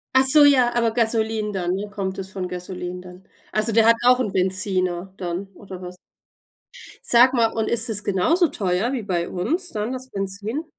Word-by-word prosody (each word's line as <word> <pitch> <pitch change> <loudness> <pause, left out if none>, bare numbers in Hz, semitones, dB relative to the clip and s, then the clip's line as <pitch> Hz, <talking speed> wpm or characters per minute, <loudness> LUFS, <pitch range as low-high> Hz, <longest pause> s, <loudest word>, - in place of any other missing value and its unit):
Ach 260 0 +5
so 295 +3 +6
ja, 255 -4 +4
aber 230 -1 +2
Gasoline 220 -2 0
dann 180 -2 -2
ne, 205 +2 -5
kommt 195 -2 -4
es 190 0 -7
von 185 -1 -4
Gasoline 180 0 -6
dann? 180 +1 -13 0.3
Also, 215 +1 0
der 225 0 +4
hat 230 - +6
auch 250 0 +5
'n 215 -6 -1
Benziner 185 -1 -1
dann 180 +2 -4
oder 190 -1 -11
was? 180 0 -8 1.1
Sag 245 +2 +5
mal, 230 -2 +2
und 220 -1 -2
ist 235 +1 +3
es 210 -2 +4
genauso 315 - +2
teuer 195 +2 -1
wie 255 - -3
bei 175 -4 -2
uns 315 - -2
dann, 215 +4 -3
das 260 0 -8
Benzin? 200 +9 -4
210 Hz, 190 wpm, -22 LUFS, 185-235 Hz, 1.1 s, so